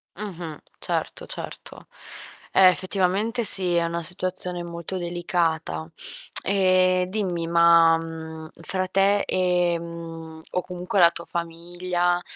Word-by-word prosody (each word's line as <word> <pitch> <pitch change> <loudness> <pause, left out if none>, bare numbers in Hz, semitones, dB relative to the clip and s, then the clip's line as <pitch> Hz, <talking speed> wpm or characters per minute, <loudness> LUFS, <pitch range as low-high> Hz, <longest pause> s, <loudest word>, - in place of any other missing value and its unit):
Mh-mh. 175 -6 -6 0.2
Certo, - - -3
certo. - - -8 0.7
Eh, 190 -1 +8
effettivamente 195 +5 0
sì, 185 -4 +3
è 170 0 +3
una 170 0 -3
situazione 180 0 -3
molto 170 +2 -6
delicata. 165 - -1 0.6
Ehm, 185 -2 +3
dimmi, 180 -4 -2
ma, 170 -1 +6
mhmm, 160 -1 -7
fra 185 +2 -2
te 195 +2 +3
e, 180 -2 +1
mhmm, 165 -1 -8
o 180 - 0
comunque 180 +2 -3
la 170 -1 +8
tua 170 - -9
famiglia, 175 +1 -2
175 Hz, 115 wpm, -24 LUFS, 170-185 Hz, 0.7 s, Eh